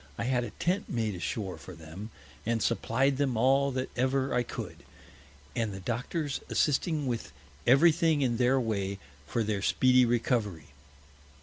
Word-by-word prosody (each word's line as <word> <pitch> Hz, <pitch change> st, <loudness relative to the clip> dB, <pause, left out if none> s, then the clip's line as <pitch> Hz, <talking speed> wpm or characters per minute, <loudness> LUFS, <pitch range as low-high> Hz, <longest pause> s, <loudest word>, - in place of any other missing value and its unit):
I -, -, -2 dB
had 125 Hz, 0 st, +1 dB
a 120 Hz, -, -4 dB
Tent 180 Hz, -, -1 dB
made 110 Hz, -3 st, -1 dB
ashore 90 Hz, -1 st, -4 dB
for 90 Hz, +3 st, -10 dB
them, 80 Hz, +7 st, -9 dB, 0.3 s
and 115 Hz, -1 st, 0 dB
supplied 135 Hz, +3 st, +1 dB
them 135 Hz, -4 st, 0 dB
all 135 Hz, +4 st, +4 dB
that 130 Hz, 0 st, -3 dB
ever 130 Hz, +1 st, +1 dB
I 125 Hz, -, +3 dB
could, 120 Hz, -, -6 dB, 0.8 s
and 115 Hz, -4 st, 0 dB
the 95 Hz, -, -6 dB
Doctors 130 Hz, -, -3 dB
assisting 150 Hz, +1 st, +1 dB
with 120 Hz, -3 st, -3 dB, 0.4 s
every 140 Hz, +7 st, +7 dB
thing 160 Hz, -2 st, +2 dB
in 120 Hz, -3 st, +1 dB
their 130 Hz, +2 st, +3 dB
Way 100 Hz, -5 st, -1 dB, 0.3 s
for 115 Hz, +8 st, 0 dB
their 105 Hz, -2 st, -1 dB
speedy 130 Hz, +5 st, +4 dB
Recovery. 115 Hz, -, 0 dB
120 Hz, 160 wpm, -29 LUFS, 110-135 Hz, 0.8 s, every